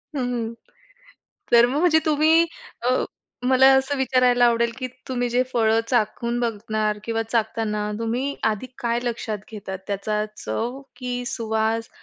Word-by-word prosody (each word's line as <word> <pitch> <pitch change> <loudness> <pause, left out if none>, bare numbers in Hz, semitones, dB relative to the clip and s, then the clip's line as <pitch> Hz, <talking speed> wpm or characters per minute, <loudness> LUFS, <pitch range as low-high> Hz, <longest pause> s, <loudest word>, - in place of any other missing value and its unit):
हं, 270 - -1
हं. 235 -2 -2 1.0
तर 235 0 +8
मग 265 +4 -1
म्हणजे 320 -2 +5
तुम्ही 315 +2 +4 0.4
अ, 245 - 0 0.6
मला 265 0 +6
असं 270 +2 +1
विचारायला 250 -2 +3
आवडेल 235 0 +2
की 255 - -2 0.2
तुम्ही 245 -1 -1
जे 245 +2 +3
फळं 225 -1 +3
चाखून 235 0 0
बघणार 215 -2 -1
किंवा 225 -1 -1
चाखताना 220 -2 -1
तुम्ही 245 +5 -1
आधी 220 +2 0
काय 235 -1 0
लक्षात 225 -3 -3
घेतात? 195 -3 -6
त्याचा 210 +1 -1
चव 235 - -3 0.2
की 250 -1 -4
सुवास 225 0 -1
235 Hz, 140 wpm, -23 LUFS, 220-255 Hz, 1.0 s, तर